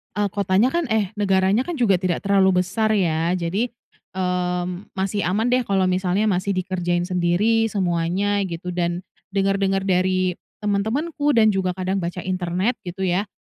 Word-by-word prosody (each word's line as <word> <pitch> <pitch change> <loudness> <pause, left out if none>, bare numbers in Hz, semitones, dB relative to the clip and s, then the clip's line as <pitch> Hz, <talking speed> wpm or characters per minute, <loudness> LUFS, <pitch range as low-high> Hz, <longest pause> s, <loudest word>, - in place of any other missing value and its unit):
eee, 205 -2 0
kotanya 200 +4 +2
kan 340 -4 0
eh 220 -4 0
negaranya 195 - +2
kan 350 - -3
juga 205 - +2
tidak 185 -1 -1
terlalu 190 -2 +3
besar 215 +4 0
ya 170 -2 +1
jadi, 185 +7 -1 0.5
eee, 180 -1 -1 0.3
masih 195 +1 -1
aman 220 +6 +1
deh 255 - +4
kalau 195 -1 +2
misalnya 185 +2 +1
masih 195 -1 0
dikerjain 175 -2 -1
sendiri 185 +6 +2
semuanya 190 +1 0
gitu, 175 +1 -5
dan 175 0 -2 0.3
denger-denger 195 0 +1
dari 185 -1 +1 0.2
teman-temanku 275 +9 0
dan 220 -2 +5
juga 185 -2 -1
kadang 190 +1 -1
baca 175 +1 -4
internet 185 +5 -1
gitu 190 +2 -4
ya, 185 +3 0
190 Hz, 150 wpm, -22 LUFS, 180-205 Hz, 0.5 s, dan